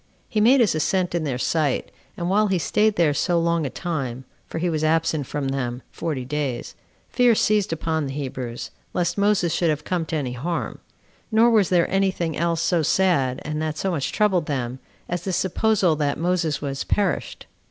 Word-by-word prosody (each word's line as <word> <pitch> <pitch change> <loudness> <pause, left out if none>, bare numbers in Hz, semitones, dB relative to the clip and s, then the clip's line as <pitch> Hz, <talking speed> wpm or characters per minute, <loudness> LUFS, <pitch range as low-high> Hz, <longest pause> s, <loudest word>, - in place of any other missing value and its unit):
He 215 -3 0
made 250 +4 +6
his 225 - +3
ascent 180 +4 0
in 170 -2 -1
their 130 -4 -1
sight; 150 +1 0 0.3
and 175 - -2
while 210 +3 +3
he 190 -2 +1
staid 210 +5 +2
there 165 -4 +3
so 170 +4 +1
long 170 -2 +1
a - - -4
time, 135 -7 -4 0.2
[for - - -6
he 175 +2 0
was 155 -2 -1
absent 155 -3 +1
from 145 -2 -2
them 125 -2 -3
forty 150 -7 -3
days,] 140 -2 -3 0.4
fear 245 -2 +4
seized 210 -2 +2
upon 160 -2 -1
the 135 - -5
Hebrews, 130 -4 -5 0.2
lest 175 -1 0
Moses 200 -5 +2
should 170 -1 +1
have 150 -1 -1
come 175 -3 -2
to - - -3
any 135 -5 -2
harm; 165 +8 -3 0.5
nor 225 +2 +5
was 210 -5 +4
there 175 -2 +3
any 195 0 +3
thing 170 -4 -3
else 170 0 0
so 170 0 +2
sad, 150 -6 +1
and 155 0 -3
that 155 -1 -2
so 190 - -1
much 145 -6 -2
troubled 190 -6 +2
them, 130 -3 -3 0.3
as 175 -1 -3
this 185 -1 -1
supposal 190 -2 +2
that 145 -2 0
Moses 165 -3 0
was 135 -1 -3
perished. 205 - -1
165 Hz, 195 wpm, -23 LUFS, 145-185 Hz, 0.5 s, made